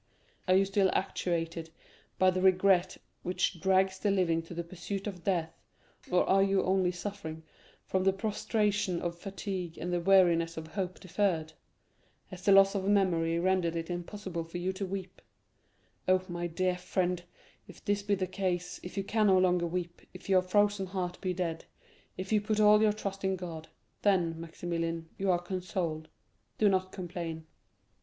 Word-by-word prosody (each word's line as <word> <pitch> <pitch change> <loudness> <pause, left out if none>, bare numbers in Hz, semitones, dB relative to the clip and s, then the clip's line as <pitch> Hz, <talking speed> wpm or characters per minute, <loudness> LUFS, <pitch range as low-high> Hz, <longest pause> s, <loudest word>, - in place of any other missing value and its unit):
Are 185 - +5
you 195 +1 +5
still 195 0 +2
actuated 165 -3 -2 0.5
by 185 0 +5
the 185 0 -1
regret 185 -1 +4 0.2
which 180 -1 -1
drags 190 0 +3
the 210 - +1
living 180 -4 +2
to 165 +1 -10
the 170 - -3
pursuit 185 +3 -6
of 185 -5 -6
death; 170 -4 0 0.6
or 180 - +3
are 195 0 +4
you 195 0 +3
only 185 -1 +2
suffering 175 -4 -6 0.4
from 190 0 0
the 195 - +4
prostration 205 -2 0
of 170 -1 -3
fatigue 185 -2 -5
and 180 +1 -3
the 175 - +1
weariness 170 -3 +4
of 160 - -5
hope 185 0 -4
deferred? 170 -4 -1 0.8
Has 185 -2 -9
the 200 - +4
loss 195 0 +7
of 195 -2 -2
memory 175 -5 +2
rendered 175 -1 +1
it 165 +1 -3
impossible 175 0 -4
for 165 +2 -7
you 180 +2 -1
to 190 +1 -4
weep? 190 -1 -6 0.9
Oh, 185 0 +4
my 175 -1 -3
dear 180 +2 -1
friend, 180 -1 -1 0.5
if - - -15
this 205 -1 +1
be 200 0 +1
the 190 -1 -1
case,—if 180 0 -3
you 195 - 0
can 215 +2 +2
no 190 -1 +6
longer 180 -2 +3
weep, 175 0 -4
if 180 - -11
your 190 -2 +5
frozen 205 +1 +2
heart 180 -1 -4
be 185 - -1
dead, 165 -3 -3 0.5
if 190 +2 -5
you 210 -1 +4
put 215 0 -1
all 210 0 +6
your 215 -1 +5
trust 195 -2 -5
in 190 0 +1
God, 165 -3 -7 0.3
then, 170 -5 +2
Maximilian, 165 -1 -4
you 195 0 0
are 180 - +4
consoled—do 175 +1 -4
not 185 -1 +1
complain." 170 -3 -5
185 Hz, 170 wpm, -31 LUFS, 170-195 Hz, 0.9 s, loss